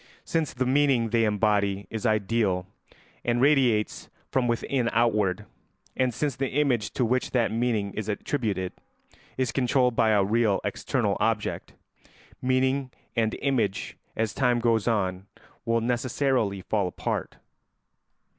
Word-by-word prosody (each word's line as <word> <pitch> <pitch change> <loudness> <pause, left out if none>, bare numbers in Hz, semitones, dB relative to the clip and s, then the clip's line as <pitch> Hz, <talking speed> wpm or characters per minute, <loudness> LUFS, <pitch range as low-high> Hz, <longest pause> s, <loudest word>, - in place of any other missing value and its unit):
Since 160 -4 -1
the 130 0 0
meaning 130 -3 +3
they 115 -1 +3
embody 100 -2 +1
is 110 +2 -2
ideal 105 -3 +1 0.6
and 120 0 +1
radiates 130 -6 +2 0.2
from 130 -2 +1
within 120 +1 0
outward, 105 -4 +1 0.5
and 130 -1 +1
since 140 +3 -2
the 135 -1 -2
image 130 -7 +1
to 125 - +1
which 125 +3 0
that 120 -4 +1
meaning 110 -3 0
is 110 -1 -4
attributed 105 -4 -2 0.6
is 130 -3 0
controlled 125 -1 +2
by 110 - +3
a 105 -2 +4
real 105 0 +2
external - - -1
object, - - -1 0.7
meaning 130 +1 +1 0.3
and 115 -2 +1
image, 120 -8 0 0.2
as 110 -2 -1
time 120 -1 +2
goes 115 -2 +1
on, 95 -4 0 0.4
will 115 0 +1
necessarily 120 -3 0
fall 100 0 0
apart. 90 - -3
115 Hz, 130 wpm, -26 LUFS, 105-130 Hz, 0.7 s, a